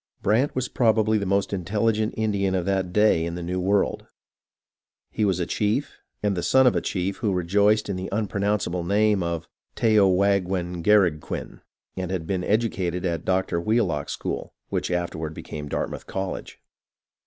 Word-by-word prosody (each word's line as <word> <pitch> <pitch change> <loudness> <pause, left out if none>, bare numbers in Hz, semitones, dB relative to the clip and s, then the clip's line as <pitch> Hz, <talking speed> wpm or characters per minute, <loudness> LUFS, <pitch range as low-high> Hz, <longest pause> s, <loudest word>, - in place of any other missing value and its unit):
Brant 115 +8 +2
was 130 -1 -1
probably 110 -3 +2
the 100 - -3
most 100 +1 +1
intelligent 105 +4 0
Indian 100 -3 0
of 90 -2 -1
that 95 -2 0
day 105 -4 +3
in 85 0 -3
the 90 - -5
New 90 +2 -2
World. 100 +2 0 1.0
He 110 - -1
was 95 -3 +1
a 85 - 0
chief, 105 - -1 0.2
and 100 -2 +1
the 90 - -2
son 130 +8 +4
of 125 - +4
a - - +1
chief 95 +1 -2
who 110 -4 0
rejoiced 100 +4 +2
in 100 -2 -2
the 95 +1 -4
unpronounceable 100 -3 -1
name 105 +2 +2
of 85 -1 -3 0.3
Tehow 105 -4 +4
aghwengaraghkwin, 90 -2 +1 0.3
and 95 -1 -3
had 90 -4 -3
been 90 +1 -2
educated 95 -5 0
at 85 -2 -2
Dr. 95 -2 0
Wheel 110 -1 +2
ock's 75 -2 -3
school, - - -5
which - - -2
afterward 80 -3 -3
became 75 -1 -7
Dartmouth - - -4
College. 95 -1 -5
95 Hz, 165 wpm, -24 LUFS, 90-105 Hz, 1.0 s, son